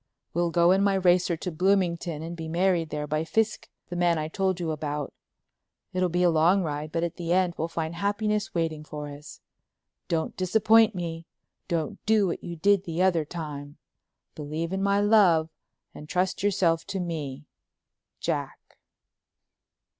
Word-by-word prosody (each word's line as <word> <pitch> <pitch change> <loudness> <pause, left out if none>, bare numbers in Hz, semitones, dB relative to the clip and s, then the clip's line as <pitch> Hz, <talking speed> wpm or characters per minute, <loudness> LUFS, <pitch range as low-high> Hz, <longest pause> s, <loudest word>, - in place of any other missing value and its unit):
We'll 175 +1 +1
go 170 +1 +4
in 190 +1 +4
my 200 -1 +3
racer 180 -2 +3
to 180 +2 -4
Bloomington 170 -2 0
and 170 +1 -6
be 165 -1 -6
married 170 -1 +1
there 150 -1 -3
by 155 +1 -1
Fiske, 220 +6 -1 0.2
the 175 - -5
man 175 -1 +2
I 155 0 -3
told 190 0 0
you 165 -2 -2
about. 150 -2 -4 0.8
It'll 185 0 +1
be 175 +1 +1
a 175 - +5
long 170 +5 +4
ride 150 -1 -4
but 165 +1 -1
at 170 0 -3
the 170 -1 -3
end 180 -1 +3
we'll 160 - -2
find 165 -1 -3
happiness 210 +3 -1
waiting 160 -2 -1
for 150 -1 -7
us. 145 +1 -11 0.7
Don't 160 -1 -1
disappoint 220 +3 +4
me—don't 165 -1 -5
do 215 -2 +4
what 175 - -3
you 170 - -5
did 200 +4 +2
the 170 +2 -1
other 170 -5 +2
time. 145 -3 -7 0.6
Believe 155 +3 -4
in 190 - -1
my 200 0 +2
love 195 -7 +4 0.4
and 150 - -11
trust 180 +1 0
yourself 185 -5 +2
to 195 -1 -4
me— 150 -5 -4 0.7
Jack." - - -2
170 Hz, 160 wpm, -26 LUFS, 160-190 Hz, 0.8 s, a